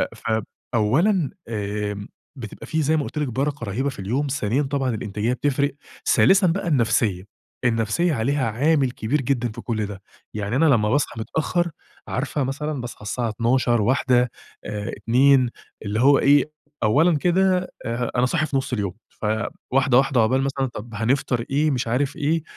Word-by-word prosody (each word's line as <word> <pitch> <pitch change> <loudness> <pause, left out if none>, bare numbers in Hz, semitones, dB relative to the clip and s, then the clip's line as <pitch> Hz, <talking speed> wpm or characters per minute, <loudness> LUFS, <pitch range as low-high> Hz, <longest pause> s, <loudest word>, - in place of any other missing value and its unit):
ف 110 0 -1 0.3
أولًا 150 - +2 0.2
آآ 105 -1 -3 0.3
بتبقى 115 -5 -8
في 160 -1 0
زي 155 +2 +2
ما 150 - 0
قُلت 150 - -7
لِك 150 - 0
برَكة 135 +2 -2
رهيبة 120 +8 -1
في 135 - -9
اليوم، 125 +10 -1
ثانيًا 130 -1 0
طبعًا 135 -1 -1
الإنتاجية 105 +3 -2
بتفرِق، 140 +1 0 0.4
ثالثًا 190 0 +5
بقى 180 +2 -1
النفسية، 115 - +1 0.4
النفسية 115 +9 +1
عليها 130 +1 0
عامل 140 +2 +2
كبير 130 +5 -1
جدًا 125 -3 -1
في 120 +2 -8
كل 110 -3 -2
ده، 100 -1 -8 0.3
يعني 105 +2 -2
أنا 155 +5 +4
لمّا 115 -8 +3
باصحى 135 -3 0
متأخر، 170 +7 -1 0.4
عارفة 140 +2 -2
مثلًا 140 +1 -3
باصحى 120 -3 -8
الساعة 115 +3 -2
12:00، 120 +1 +1
13:00، 125 +1 +2 0.3
آآ 105 +1 -4
14:00، 130 +1 +4 0.4
اللي 105 +2 -1
هو 140 +1 +6
إيه 145 +1 +4 0.3
أولًا 150 +10 +4
كده 185 +3 +2
آآ 115 +1 -2
أنا 125 0 +3
صاحي 155 +4 +1
في 145 - -1
نص 135 -1 -3
اليوم، 100 -6 -1 0.2
فواحدة 120 +4 0
واحدة 135 -1 +3
عقبال 130 +4 +2
مثلًا 135 0 -1
طَب 115 -1 -9
هنفطَر 120 +1 0
إيه، 150 +3 +2
مش 125 -3 -1
عارف 135 +5 0
إيه، 155 +2 0
130 Hz, 165 wpm, -23 LUFS, 115-145 Hz, 0.4 s, هو